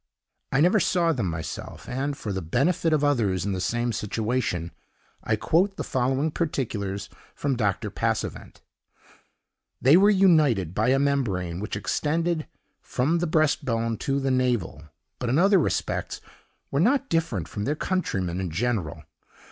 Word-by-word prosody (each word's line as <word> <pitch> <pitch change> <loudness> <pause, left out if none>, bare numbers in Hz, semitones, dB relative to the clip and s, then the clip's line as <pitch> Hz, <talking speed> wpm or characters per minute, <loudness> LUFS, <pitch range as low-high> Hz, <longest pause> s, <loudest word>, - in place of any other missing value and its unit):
I 135 - +3
never 180 +6 +4
saw 170 -2 +2
them 120 -9 -1
myself; 80 -1 -6
and, 140 +3 -2
for 105 - -4
the 95 - -2
benefit 160 - +1
of 155 -2 +2
others 105 - +1
in 100 - -1
the 95 -1 -2
same 120 +5 0
situation, 105 -5 -2 0.5
I 110 - +1
quote 180 - +1
the - - -3
following 130 +4 0
particulars 105 - -2 0.3
from 140 -2 -1
Dr. 105 -6 -1
Passavent: - - -3 1.2
"They 140 +6 +6
were 200 +2 +6
united 155 - +4
by 110 +4 +1
a 135 - +4
membrane 105 -12 0
which 105 - -4
extended 160 - -1 0.3
from 155 +7 0
the 175 - 0
breast 155 -1 +2
bone 115 -2 -1
to 135 0 0
the 135 -1 0
navel; 120 -12 0 0.3
but, 125 - -2
in 130 - +2
other 195 +2 +5
respects, 155 - -2 0.5
were 140 - 0
not 270 - +3
different 160 - -1
from 105 +4 -4
their 150 - 0
countrymen 95 - -2
in 95 - -3
general. 95 -3 -2
130 Hz, 155 wpm, -25 LUFS, 100-155 Hz, 1.2 s, They